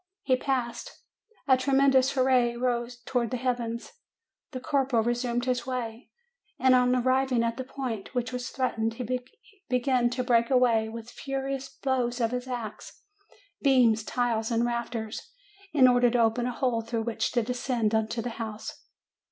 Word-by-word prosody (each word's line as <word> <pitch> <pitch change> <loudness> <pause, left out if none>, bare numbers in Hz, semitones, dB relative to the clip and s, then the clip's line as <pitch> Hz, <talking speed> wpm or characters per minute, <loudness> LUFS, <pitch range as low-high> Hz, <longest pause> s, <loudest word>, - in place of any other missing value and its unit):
He 260 - +3
passed. 255 -3 -3 0.5
A 260 - +6
tremendous 270 0 +3
hurrah 255 -3 +3
rose 240 -1 -1
to 255 - -2
wards 240 +1 -2
heaven. 240 -2 -1 0.7
The 255 - -6
corporal 265 -4 +1
resumed 240 +1 -1
his 250 -1 -1
way, 240 -2 -4 0.5
and 260 0 +4
on 250 0 +4
arriving 255 -1 +2
at 230 0 -1
the 260 - -3
point 255 -4 -5
which 245 0 -1
was 250 0 -4
threatened, 225 -3 -1
be 250 +2 -1 0.5
began 250 -1 +2
to 250 +1 -2
break 235 -2 +3
away, 240 -4 +3
with 230 +1 -8
furious 270 0 -4
blows 255 -2 -1
of 230 -1 +1
his 250 +1 -3
axe, 235 -4 -7 0.6
beams, 245 -6 +4
tiles, 230 -1 -1
and 235 0 +1
rafters, 235 - -4 0.4
in 265 -4 +6
order 245 -1 +4
to 245 - +1
open 230 +2 +2
a - - -1
hole 245 -2 0
through 225 0 -3
which 230 -1 -1
to 240 -2 +2
descend 245 -2 -1
into 220 +1 0
the 245 - -3
house. 220 -1 -6
245 Hz, 160 wpm, -27 LUFS, 230-255 Hz, 0.7 s, A